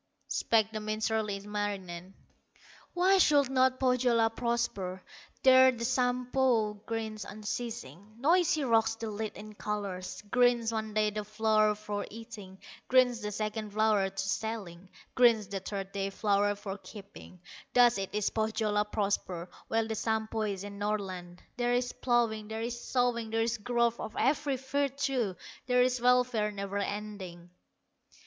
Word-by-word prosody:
Spake 220 Hz, -1 st, +2 dB
the 220 Hz, -, -4 dB
minstrel, 215 Hz, +1 st, -1 dB
Ilmarinen: 195 Hz, -3 st, -4 dB, 0.8 s
"Why 375 Hz, +2 st, +4 dB
should 285 Hz, -6 st, +4 dB
not 260 Hz, 0 st, +3 dB
Pohyola 245 Hz, -3 st, +3 dB
prosper? 225 Hz, -6 st, -2 dB, 0.4 s
There 260 Hz, 0 st, +8 dB
the 235 Hz, -2 st, -4 dB
Sampo 250 Hz, -2 st, +1 dB
grinds 220 Hz, -1 st, -3 dB
unceasing, 215 Hz, -, -6 dB
Noisy 315 Hz, +3 st, +3 dB
rocks 225 Hz, -3 st, +3 dB
the 225 Hz, -1 st, -5 dB
lid 215 Hz, +1 st, -4 dB
in 215 Hz, 0 st, -10 dB
colors; 200 Hz, -3 st, -4 dB
Grinds 245 Hz, -2 st, +3 dB
one 220 Hz, -1 st, -3 dB
day 215 Hz, 0 st, +2 dB
the 210 Hz, 0 st, -3 dB
flour 215 Hz, 0 st, +2 dB
for 205 Hz, -1 st, -4 dB
eating, 210 Hz, -4 st, -10 dB, 0.3 s
Grinds 250 Hz, -2 st, +4 dB
the 210 Hz, 0 st, -3 dB
second 215 Hz, 0 st, -4 dB
flour 215 Hz, -2 st, +3 dB
for 195 Hz, -, -24 dB
selling, 195 Hz, -2 st, -3 dB, 0.2 s
Grinds 235 Hz, -4 st, +5 dB
the 195 Hz, -1 st, -3 dB
third 195 Hz, 0 st, -5 dB
day 195 Hz, 0 st, -2 dB
flour 205 Hz, 0 st, +1 dB
for 200 Hz, 0 st, -6 dB
keeping; 195 Hz, -1 st, -12 dB, 0.4 s
Thus 245 Hz, -3 st, +6 dB
it 195 Hz, -, -3 dB
is 210 Hz, -1 st, 0 dB
Pohyola 215 Hz, -1 st, 0 dB
prospers. 195 Hz, -4 st, -2 dB, 0.2 s
While 225 Hz, 0 st, 0 dB
the 220 Hz, -, -2 dB
Sampo 220 Hz, 0 st, -1 dB
is 200 Hz, -3 st, -2 dB
in 200 Hz, 0 st, -8 dB
Northland, 190 Hz, -4 st, -4 dB
There 245 Hz, 0 st, +1 dB
is 245 Hz, 0 st, 0 dB
plowing, 230 Hz, -4 st, 0 dB
there 220 Hz, +1 st, -4 dB
is 240 Hz, 0 st, -4 dB
sowing, 245 Hz, -3 st, 0 dB
There 225 Hz, 0 st, +1 dB
is 230 Hz, 0 st, -1 dB
growth 235 Hz, +1 st, +1 dB
of 215 Hz, -, -6 dB
every 275 Hz, +1 st, +1 dB
virtue, 270 Hz, -5 st, -1 dB, 0.3 s
There 250 Hz, 0 st, +4 dB
is 250 Hz, -1 st, 0 dB
welfare 250 Hz, -3 st, +3 dB
never 200 Hz, 0 st, -4 dB
ending." 200 Hz, -4 st, -5 dB
220 Hz, 145 wpm, -30 LUFS, 205-240 Hz, 0.8 s, There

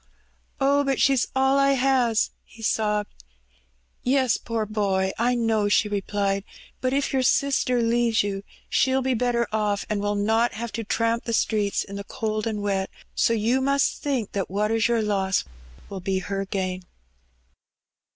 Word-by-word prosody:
Oh, 280 Hz, +1 st, +3 dB
but 275 Hz, -1 st, 0 dB
she's 270 Hz, -3 st, +3 dB
all 265 Hz, +1 st, +3 dB
I 275 Hz, 0 st, +4 dB
has," 255 Hz, -4 st, +2 dB
he 225 Hz, -, -15 dB
sobbed. 210 Hz, -, -1 dB, 0.8 s
Yes, 260 Hz, -2 st, +2 dB
poor 230 Hz, -2 st, -3 dB
boy, 195 Hz, -3 st, 0 dB
I 245 Hz, +2 st, +2 dB
know," 225 Hz, -3 st, +1 dB
she 210 Hz, -, +3 dB
replied. 200 Hz, -1 st, -1 dB
^' -, -, -40 dB, 0.4 s
But 255 Hz, -, 0 dB
if 280 Hz, +1 st, 0 dB
your 265 Hz, -, +2 dB
sister 255 Hz, -2 st, +2 dB
leaves 230 Hz, -1 st, +2 dB
you 195 Hz, -1 st, -3 dB, 0.3 s
she'll 265 Hz, 0 st, +2 dB
be 260 Hz, 0 st, +1 dB
better 240 Hz, -1 st, +1 dB
oflf, 210 Hz, -2 st, 0 dB
and 205 Hz, -1 st, 0 dB
will 205 Hz, 0 st, 0 dB
not 225 Hz, +3 st, +1 dB
have 230 Hz, +1 st, -5 dB
to 225 Hz, +3 st, -4 dB
tramp 230 Hz, +2 st, 0 dB
the 230 Hz, -, -2 dB
streets 210 Hz, -2 st, +1 dB
in 200 Hz, 0 st, -8 dB
the 200 Hz, -, -5 dB
cold 215 Hz, -1 st, -3 dB
and 210 Hz, -2 st, -3 dB
wet; 195 Hz, -1 st, -1 dB, 0.2 s
so 230 Hz, -, +2 dB
you 230 Hz, +4 st, +1 dB
must 275 Hz, +1 st, +1 dB
think 260 Hz, -8 st, -1 dB
that 195 Hz, -2 st, -2 dB
what 210 Hz, +3 st, 0 dB
is 225 Hz, -1 st, +2 dB
your 235 Hz, -2 st, +1 dB
loss 195 Hz, -2 st, +1 dB, 0.4 s
will 195 Hz, -, -6 dB
be 190 Hz, +1 st, -1 dB
her 195 Hz, +1 st, -3 dB
gain." 185 Hz, -1 st, -3 dB
225 Hz, 170 wpm, -24 LUFS, 205-250 Hz, 0.8 s, I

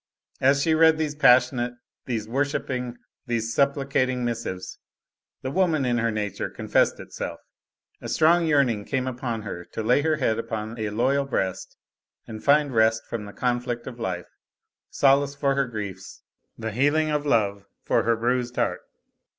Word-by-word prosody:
As 140 Hz, +1 st, +3 dB
she 160 Hz, -, +2 dB
read 160 Hz, 0 st, +5 dB
these 155 Hz, -2 st, -1 dB
passionate, 125 Hz, -3 st, +4 dB, 0.3 s
these 110 Hz, -4 st, -2 dB
worshiping, 125 Hz, -1 st, -2 dB, 0.3 s
these 115 Hz, -1 st, -1 dB
supplicating 135 Hz, -2 st, +1 dB
missives, 115 Hz, -6 st, -4 dB, 0.6 s
the 130 Hz, -, -3 dB
woman 165 Hz, -5 st, +2 dB
in 120 Hz, -1 st, +1 dB
her 115 Hz, 0 st, +1 dB
nature 105 Hz, -3 st, -3 dB
confessed -, -, +1 dB
itself; -, -, -6 dB, 0.6 s
a -, -, -6 dB
strong 170 Hz, +1 st, +4 dB
yearning 130 Hz, -9 st, +2 dB
came 130 Hz, +3 st, -2 dB
upon 120 Hz, -3 st, -3 dB
her 90 Hz, -4 st, -6 dB
to 110 Hz, -, -3 dB
lay 125 Hz, +6 st, +3 dB
her 155 Hz, +1 st, +2 dB
head 120 Hz, -7 st, 0 dB
upon 110 Hz, 0 st, -5 dB
a 110 Hz, -1 st, -1 dB
loyal 130 Hz, +6 st, +1 dB
breast 95 Hz, -9 st, -3 dB, 0.5 s
and 110 Hz, -1 st, -9 dB
find 145 Hz, -1 st, +3 dB
rest 110 Hz, 0 st, +3 dB
from 115 Hz, -3 st, -5 dB
the 100 Hz, -, -9 dB
conflict 120 Hz, 0 st, -2 dB
of 120 Hz, -2 st, -8 dB
life, 90 Hz, -5 st, -4 dB, 0.6 s
solace 140 Hz, 0 st, +3 dB
for 140 Hz, -1 st, +1 dB
her 135 Hz, -1 st, +1 dB
griefs, 100 Hz, -4 st, -7 dB, 0.3 s
the 110 Hz, 0 st, -4 dB
healing 145 Hz, +6 st, +2 dB
of 150 Hz, 0 st, -1 dB
love 100 Hz, -6 st, +1 dB, 0.2 s
for -, -, +2 dB
her 115 Hz, 0 st, +2 dB
bruised 120 Hz, +1 st, -1 dB
heart. -, -, 0 dB
125 Hz, 160 wpm, -25 LUFS, 110-140 Hz, 0.6 s, read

